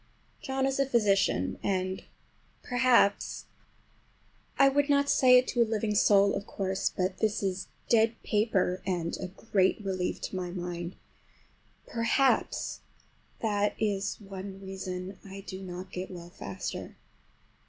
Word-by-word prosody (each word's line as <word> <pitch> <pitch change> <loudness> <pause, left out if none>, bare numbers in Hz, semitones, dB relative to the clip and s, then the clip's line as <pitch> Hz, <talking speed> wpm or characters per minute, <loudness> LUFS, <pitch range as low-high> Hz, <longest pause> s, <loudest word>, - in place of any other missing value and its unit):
John 265 0 -1
is 270 0 0
a 275 - +4
physician, 195 - +2
and 185 -1 -1 0.6
perhaps—(I 245 +2 0
would 285 +1 +2
not 280 0 +3
say 255 -2 +7
it 250 - +3
to 240 - +1
a - - +8
living 220 -1 -1
soul, 200 -1 +5
of 200 - -4
course, 190 -1 -1
but 185 0 -2
this 215 -2 0
is 190 -1 -2 0.2
dead 225 0 +4
paper 205 -4 +1
and 175 -3 -1
a 185 - -4
great 190 +1 +1
relief 185 -2 -1
to - - -5
my 180 -1 -3
mind)—perhaps 180 +7 -2 0.6
that 205 -2 +1
is 200 -2 -1
one 195 -1 -8
reason 190 -1 -6
I 195 0 -9
do 190 -1 -8
not 185 0 -7
get 185 0 -5
well 175 -1 -9
faster. 100 - -6
195 Hz, 130 wpm, -29 LUFS, 185-225 Hz, 0.6 s, a